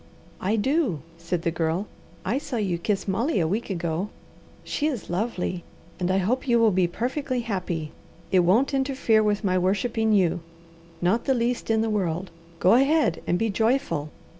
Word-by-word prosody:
"I 200 +4 0
do!" 250 - +1 0.2
said 170 0 -2
the 170 - +1
Girl. 165 +3 -1 0.4
"I 235 +8 +1
saw 275 - -5
you 190 -6 -1
kiss 200 +3 -1
Molly 230 +8 +1
a 165 - +2
week 210 +8 -2
ago. 175 +1 -2 0.5
She 300 - -1
is 250 - -4
lovely, 180 -3 -2 0.4
and 180 0 0
I 190 - +2
hope 230 +9 0
you 240 -1 +4
will 225 -2 +5
be 185 -2 +2
perfectly 255 - -2
happy. 180 -8 -3 0.4
It 185 - +5
won't 205 +11 +3
interfere 265 -5 +2
with 210 0 +1
my 185 -2 +2
worshipping 220 +4 +1
you; 180 -4 +3 0.6
not 200 +7 +2
the 265 - +2
least 240 0 -1
in 220 -1 +3
the 225 - 0
world. 180 -3 -1 0.3
Go 185 - +5
ahead 275 - +3
and 175 - +2
be 225 +1 0
joyful!" 220 - 0
205 Hz, 175 wpm, -25 LUFS, 180-240 Hz, 0.6 s, will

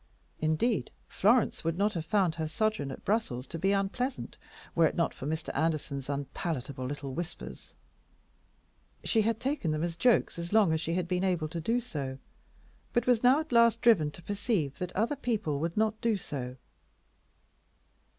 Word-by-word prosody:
Indeed, 160 +9 +1 0.2
Florence 225 +4 +2
would 165 +1 -1
not 205 +2 +2
have 160 -2 -4
found 190 -5 +2
her 160 -1 -3
sojourn 215 -3 0
at - - -8
Brussels 185 - 0
to 165 - -6
be 195 +4 +2
unpleasant 200 +7 -1 0.4
were 165 -1 +5
it - - -4
not 170 -2 +1
for 135 - -6
Mr. 160 +1 -2
Anderson's 140 -3 -1
unpalatable 140 -2 -3
little 140 -1 -5
whispers. 175 +4 -7 1.3
She 225 - +3
had 225 +1 0
taken 270 - -1
them 155 +1 0
as 170 -1 -2
jokes 230 -2 +2
as 170 0 -5
long 210 -6 +5
as 160 - 0
she 165 0 -1
had 180 -1 -1
been 180 +1 0
able 175 -5 +1
to 165 +1 -4
do 230 +9 +1
so, 140 - -5 0.8
but 240 -1 +2
was 245 -3 +3
now 255 +4 +6
at 315 - -10
last 235 -1 +5
driven 200 -12 +5
to 170 +3 -12
perceive 200 - -1
that 180 -1 -3
other 230 +8 +1
people 215 - -1
would 165 +4 -2
not 220 0 +1
do 230 -3 +2
so. 130 -7 -5
175 Hz, 175 wpm, -30 LUFS, 155-220 Hz, 1.3 s, now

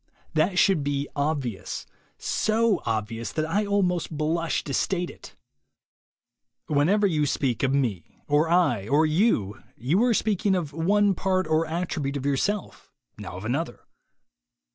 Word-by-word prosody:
That 175 +4 +1
should 185 -5 +4
be 140 0 -1
obvious, 140 -7 -2 0.3
so 220 -2 +1
obvious 115 +1 -2
that 155 - 0
I 205 +5 0
almost 185 -4 +1
blush 165 +2 0
to 140 - -5
state 180 +4 0
it. - - -14 1.3
Whenever 170 +9 +2
you 155 -6 +1
speak 130 -4 -1
of 135 - +2
Me, 120 -11 -1
or 150 +2 +2
I, 145 - +2
or 150 +5 +3
You, 155 - +1 0.2
you 155 - +1
are 245 -2 +3
speaking 205 -2 +1
now 185 - +2
of 150 -3 -8
one 200 +5 +3
part 185 0 0
or 160 +1 +1
attribute 160 -4 -2
of 135 - -6
yourself, 185 +9 -2 0.3
now 90 - -7
of 95 - -8
another. 140 +8 -2
160 Hz, 145 wpm, -25 LUFS, 140-185 Hz, 1.3 s, should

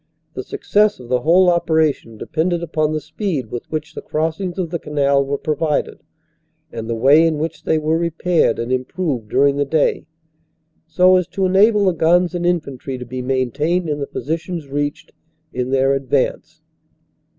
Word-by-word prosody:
The - - -4
success 210 -4 +1
of 120 -1 -12
the 125 0 +2
whole 180 +6 +4
operation 160 -9 +1
depended 170 +7 -1
upon 155 -2 -1
the 155 - -1
speed 155 - -4
with 120 - -6
which 155 0 -4
the - - -7
crossings 165 +4 -3
of 175 -4 -3
the 170 - -2
canal 140 -2 +1
were 140 +1 -2
provided, 155 0 -1 0.7
and 115 0 -6
the 115 - -1
way 140 +7 +5
in 160 -2 -1
which 160 +2 -4
they 160 - +2
were 155 +1 0
repaired 170 +1 +1
and 115 +2 -4
improved 130 - -2
during 140 0 +3
the 145 - +2
day, 150 +2 0 0.8
so 185 0 +4
as 180 - -1
to 195 - -2
enable 205 +3 +4
the 185 - +3
guns 170 +2 +2
and 175 0 -1
infantry 140 -6 -2
to 125 - -7
be 125 +2 -5
maintained 135 +7 -1
in 150 -1 -2
the 140 - -3
positions 165 0 -4
reached 145 +2 -3 0.4
in 125 0 -2
their 135 +1 +2
advance. 135 -2 -2
155 Hz, 175 wpm, -19 LUFS, 135-175 Hz, 0.8 s, way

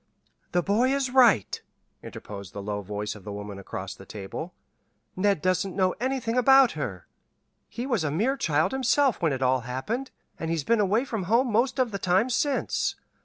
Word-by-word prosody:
"The 175 - +1
boy 230 +8 +2
is 270 -2 -1
right," 240 - +4 0.4
interposed 100 -3 -9
the 100 - -6
low 105 0 -3
voice 105 +2 -4
of 105 - -13
the 105 - -7
woman 100 -1 -7
across 95 0 -6
the - - -13
table. 105 - -7 0.6
"Ned 195 -3 +1
doesn't 185 +1 0
know 185 -1 +2
anything 250 -2 -1
about 265 0 +6
her. 100 - -5 0.6
He 240 - -5
was 235 - 0
a 155 - 0
mere 220 - +1
child 155 - +1
himself 265 -1 +2
when 165 -3 +2
it 135 -1 -2
all 130 0 +3
happened, 130 - -4 0.3
and 160 - -3
he's 165 -3 -1
been 230 +8 +2
away 210 +5 +2
from 220 -8 -3
home 235 +5 +2
most 245 +5 +1
of 255 -3 +1
the 200 - -4
time 190 +7 +2
since. 280 +3 0
185 Hz, 185 wpm, -26 LUFS, -, 0.6 s, about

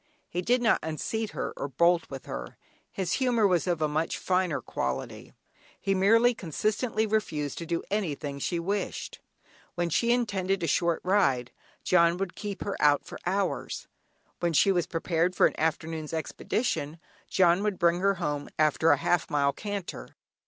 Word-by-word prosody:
He 175 - -3
did 245 +6 +2
not 225 - +4
unseat 205 +8 -3
her - - -3
or - - -3
bolt 170 +5 +2
with 135 -1 -8
her: - - -7 0.3
his 185 -3 -2
humour 240 -4 +3
was 180 -2 +2
of 170 -3 0
a - - +3
much 155 +2 -1
finer 180 -3 0
quality; 65 0 -4 0.5
he 195 - 0
merely 225 +6 +4
consistently 215 - -1
refused 155 -10 -1
to 170 - -6
do 170 0 -1
anything 150 -8 -2
she 170 +5 -1
wished. 195 +4 -3 0.6
When 175 -1 -1
she 235 +8 +2
intended 195 -6 0
a - - +2
short 170 +2 +1
ride, 135 -11 +2 0.3
"John" 170 -1 +4
would 195 -1 -3
keep 205 -2 -5
her 200 - -3
out 145 -1 +4
for - - -9
hours; 195 +2 -2 0.5
when 170 -1 0
she 195 +6 +5
was 175 -3 +1
prepared 170 +1 0
for - - +5
an - - +2
afternoon's 160 0 -2
expedition, 160 - -2 0.3
"John" 180 0 +4
would 205 -2 -1
bring 170 0 +3
her 195 +1 +2
home 150 -5 -3
after 155 +1 +3
a 145 - +6
half 165 +3 +1
mile 140 -1 +2
canter. 205 -3 -6
175 Hz, 165 wpm, -28 LUFS, 155-200 Hz, 0.6 s, a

